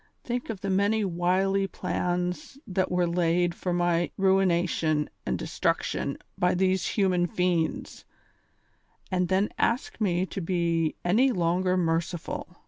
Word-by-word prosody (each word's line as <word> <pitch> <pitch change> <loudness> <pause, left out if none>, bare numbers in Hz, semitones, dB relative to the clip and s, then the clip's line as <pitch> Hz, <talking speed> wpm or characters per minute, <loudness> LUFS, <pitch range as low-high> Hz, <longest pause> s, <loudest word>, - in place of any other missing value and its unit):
Think 245 0 -3
of 210 -5 -5
the 195 - -2
many 205 +3 +2
wily 190 +2 +1
plans 180 +4 -3
that 185 -1 -1
were 180 0 +1
laid 170 0 +1
for 180 - -3
my 175 -1 +1
ruination 175 -5 +2 0.2
and - - 0
destruction - - -1 0.2
by 180 0 +3
tliese 185 0 +1
human 185 -4 +2
fiends, 175 -3 -1 1.1
and 180 -1 +1
then 190 +3 +2
ask 255 - 0
me 185 -3 +1
to 195 - -6
be 170 -2 0
any 235 +10 +4
longer 180 -1 +1
merciful. 170 0 -2
180 Hz, 130 wpm, -27 LUFS, 175-190 Hz, 1.1 s, any